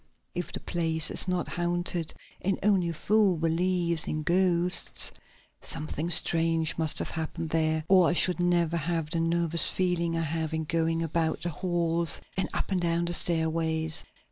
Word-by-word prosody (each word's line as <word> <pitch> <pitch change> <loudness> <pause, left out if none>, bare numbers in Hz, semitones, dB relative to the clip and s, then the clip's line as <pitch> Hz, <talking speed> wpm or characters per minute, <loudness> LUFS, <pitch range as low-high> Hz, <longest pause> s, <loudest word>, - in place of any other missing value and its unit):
If 175 -1 -5
the - - -5
place 160 -2 +1
is - - +6
not 180 -1 -2
haunted 175 -1 -2 0.3
and 195 +1 -1
only 190 -4 +2
a - - -4
fool 205 +1 +1
believes 170 +1 0
in 155 0 -3
ghosts 180 +1 +2 0.5
something 155 +2 -4
strange 165 -1 +2
must 160 -2 0
have - - -2
happened 160 0 -5
there 160 -1 0
or 185 -2 +4
I - - 0
should 180 +2 +2
never 175 -1 +1
have 165 -1 -3
the 165 - 0
nervous 170 0 +2
feeling 170 -2 -1
I 165 - -1
have 160 0 -3
in 160 - -2
going 165 +1 -1
about 160 0 -2
the 175 - -2
halls 170 0 +1 0.2
and 190 - -2
up - - -4
and 185 -2 0
down 170 0 -1
the 175 - -2
stairways. 160 -1 +1
170 Hz, 170 wpm, -27 LUFS, 160-175 Hz, 0.5 s, is